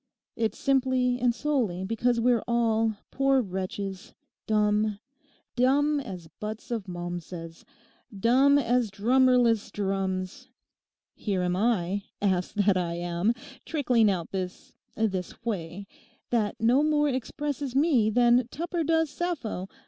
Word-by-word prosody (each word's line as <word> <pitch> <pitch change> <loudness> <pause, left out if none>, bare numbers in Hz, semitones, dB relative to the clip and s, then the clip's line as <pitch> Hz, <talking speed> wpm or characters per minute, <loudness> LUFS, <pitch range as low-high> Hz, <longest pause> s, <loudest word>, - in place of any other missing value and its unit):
'It's 225 -1 -1
simply 260 -2 +1
and 245 -1 +2
solely 240 -13 -1
because 230 +4 0
we're 235 -1 +3
all, 225 -2 +1 0.2
poor 270 0 +3
wretches, 190 -2 -5 0.3
dumb—dumb 240 +6 0
as 190 -11 -7
butts 215 +3 -6
of 220 -4 -3
Malmsez; 175 -1 -7 0.6
dumb 265 +6 +5
as 245 -3 +1
drummerless 240 +1 +3
drums. 195 +4 -3 0.6
Here 195 -4 -2
am 180 0 0
I, 200 -2 +1 0.2
ass 185 -3 0
that 200 -2 +2
I 170 -2 -1
am, 175 +6 0 0.3
trickling 250 -8 +2
out 175 -4 -2
this—this 190 +1 -4
whey 190 -3 -4 0.5
that 220 -4 0
no 240 +5 +4
more 300 -1 +2
expresses 280 +1 -3
me 270 -7 +3
than 240 +1 +4
Tupper 335 +5 -3
does 320 -1 +1
Sappho. 295 - -3
225 Hz, 115 wpm, -27 LUFS, 190-260 Hz, 0.6 s, dumb